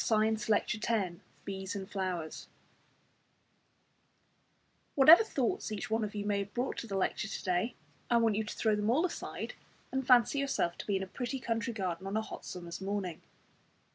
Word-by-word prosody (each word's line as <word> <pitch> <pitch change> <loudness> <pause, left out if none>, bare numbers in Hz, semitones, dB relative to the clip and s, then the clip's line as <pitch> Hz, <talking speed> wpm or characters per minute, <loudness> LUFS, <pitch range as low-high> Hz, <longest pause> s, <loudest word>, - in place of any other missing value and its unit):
Week - - -2
28 220 0 +2
Lecture 215 +1 +2
X 200 -7 0 0.3
BEES 190 0 -4
AND 195 -1 -5
FLOWERS 185 -5 -4 2.5
Whatever 315 +9 +9
thoughts 255 - -1
each 215 0 -4
one 225 0 +2
of 210 0 -4
you 205 0 -3
may 205 -1 +1
have 200 0 -5
brought 250 +2 -1
to 230 - -5
the 195 -2 -2
lecture 195 +2 0
to 215 - -5
day, 185 +6 0 0.3
I 235 - +5
want 225 -2 +3
you 220 - 0
to 215 - -6
throw 220 -2 +2
them 210 +1 0
all 295 +9 +3
aside 365 - -4 0.4
and 265 -1 -2
fancy 250 +2 +5
yourself 270 -11 0
to - - -6
be 200 - +1
in 190 - 0
a - - -3
pretty 245 +7 -4
country 230 0 -1
garden 190 -3 -3
on 200 +2 -1
a - - +2
hot - - -8
summer's 175 0 -7
morning. 190 -3 -3
210 Hz, 190 wpm, -32 LUFS, 190-235 Hz, 2.5 s, Whatever